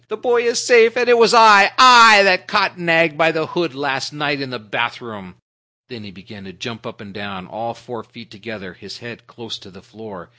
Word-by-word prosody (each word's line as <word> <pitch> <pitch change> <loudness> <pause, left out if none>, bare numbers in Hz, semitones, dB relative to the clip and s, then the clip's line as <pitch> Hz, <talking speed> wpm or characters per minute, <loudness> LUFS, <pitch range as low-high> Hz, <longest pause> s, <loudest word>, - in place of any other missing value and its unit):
"The 215 - -10
boy 240 +1 -3
is 235 +1 -3
safe, 230 -1 +1
and 240 -1 -3
it 240 -1 +1
was 225 -2 +2
I 220 -4 +5
I 235 -4 +7
I 200 - +4
that 185 -1 -1
caught 205 -2 -3
Nag 165 -2 -1
by 165 0 +1
the 160 -1 -6
hood 165 -3 -7
last 135 -1 -7
night 145 -1 -6
in 135 - -9
the 125 - -10
bathroom." 110 -3 -9 0.5
Then 120 -4 -15
he 100 - -16
began 100 +2 -20
to 95 - -17
jump 115 +5 -13
up 115 - -16
and 100 -3 -18
down, 100 -3 -12
all 115 +4 -11
four 115 -1 -14
feet 120 -1 -21
together, 105 -4 -15
his 100 +7 -16
head 120 -1 -17
close 115 0 -14
to 105 - -21
the 95 0 -23
floor. 105 -5 -18
125 Hz, 225 wpm, -15 LUFS, -, 0.5 s, I